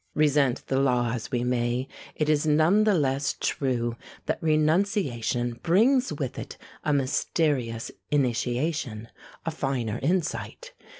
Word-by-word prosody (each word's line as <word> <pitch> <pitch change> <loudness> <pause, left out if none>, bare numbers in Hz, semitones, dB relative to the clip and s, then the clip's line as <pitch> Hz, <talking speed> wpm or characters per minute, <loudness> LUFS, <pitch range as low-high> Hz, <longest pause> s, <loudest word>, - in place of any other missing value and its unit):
Resent 145 -4 +2
the 135 - 0
law 125 -3 +2
as 115 -2 -4
we 120 -1 -1
may, 125 +1 0 0.3
it 155 - 0
is 155 0 +2
none 160 +8 +4
the 210 -2 +4
less 140 -3 0
true 120 -4 -1 0.3
that - - -2
renunciation 155 - +1
brings 245 +10 +3
with - - -4
it - - -8 0.3
a 155 - +1
mysterious 135 -3 0 0.2
initiation, 125 -3 -1 0.4
a 165 - -1
finer 130 -7 -2
insight. 140 - -2
135 Hz, 125 wpm, -26 LUFS, 120-155 Hz, 0.4 s, none